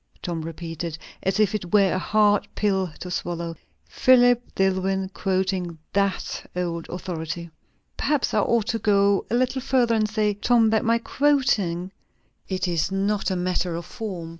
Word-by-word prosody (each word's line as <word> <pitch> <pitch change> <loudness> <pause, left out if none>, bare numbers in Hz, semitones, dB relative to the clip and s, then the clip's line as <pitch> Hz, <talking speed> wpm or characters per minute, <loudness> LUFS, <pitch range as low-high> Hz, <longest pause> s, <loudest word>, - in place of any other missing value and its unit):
Tom 170 -2 -3
repeated, 165 0 -5 0.2
as 190 +2 0
if 210 -2 +3
it 185 -5 -4
were 195 -4 +4
a 185 - 0
hard 205 0 +2
pill 190 -3 +1
to 180 - -6
swallow. 170 -2 -3 0.3
"Philip 245 -2 +5
Dillwyn 190 0 0
quoting 185 -3 -1 0.2
that 200 -1 -1
old 170 -2 -3
authority!" 170 -2 -5 0.5
"Perhaps 295 -3 0
I - - +3
ought 235 -3 +2
to 225 - 0
go 200 -1 +2
a - - 0
little 255 +2 +1
further, 250 -3 +2
and 215 -1 +1
say, 215 -1 +1
Tom, 225 +2 +3
that 220 - +2
my 230 +1 +3
quoting 230 -10 +1 0.6
it 185 -1 -1
is 170 0 0
not 200 +2 0
a 190 - -1
matter 180 -1 -1
of 170 0 -5
form. 190 -8 -6
195 Hz, 160 wpm, -24 LUFS, 175-220 Hz, 0.6 s, Philip